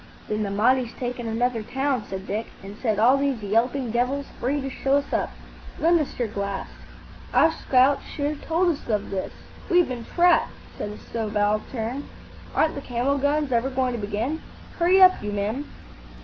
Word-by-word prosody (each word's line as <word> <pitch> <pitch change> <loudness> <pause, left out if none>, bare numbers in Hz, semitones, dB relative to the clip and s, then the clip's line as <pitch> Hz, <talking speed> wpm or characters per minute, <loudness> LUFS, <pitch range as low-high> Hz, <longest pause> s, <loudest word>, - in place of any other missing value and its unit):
"Then 215 0 -1
the 205 - -1
Mahdi's 240 +4 +2
taken 245 -1 -4
another 230 +1 0
town," 265 0 -1
said 190 0 -5
Dick, 215 +3 -3 0.2
"and 200 +1 -8
set 220 -2 -1
all 245 +6 +5
these 275 -5 -1
yelping 235 +4 +1
devils 250 +4 0
free 275 +4 0
to 270 - -4
show 270 +1 +1
us 285 - -3
up. - - +1 0.5
Lend 335 +1 +4
us 300 - -3
your 240 - 0
glass." 200 -2 -3 0.7
"Our 325 - +6
scouts 270 -2 +3
should 285 - -3
have 295 0 -2
told 345 +3 +2
us 305 -4 -3
of 210 -2 -1
this. 190 -1 -3 0.4
We've 355 -2 +4
been 245 -3 -5
trapped," 350 0 +3 0.2
said 205 - -4
a 210 - -8
subaltern. 220 +4 -2 0.5
"Aren't 315 - +3
the 280 - -5
camel 260 +3 0
guns 285 0 +1
ever 240 +2 +2
going 255 -1 0
to 235 - -3
begin? 220 +10 -2 0.4
Hurry 360 +3 +5
up, 370 -1 +7
you 210 - -3
men!" 210 +8 -2
250 Hz, 180 wpm, -25 LUFS, 215-280 Hz, 0.7 s, up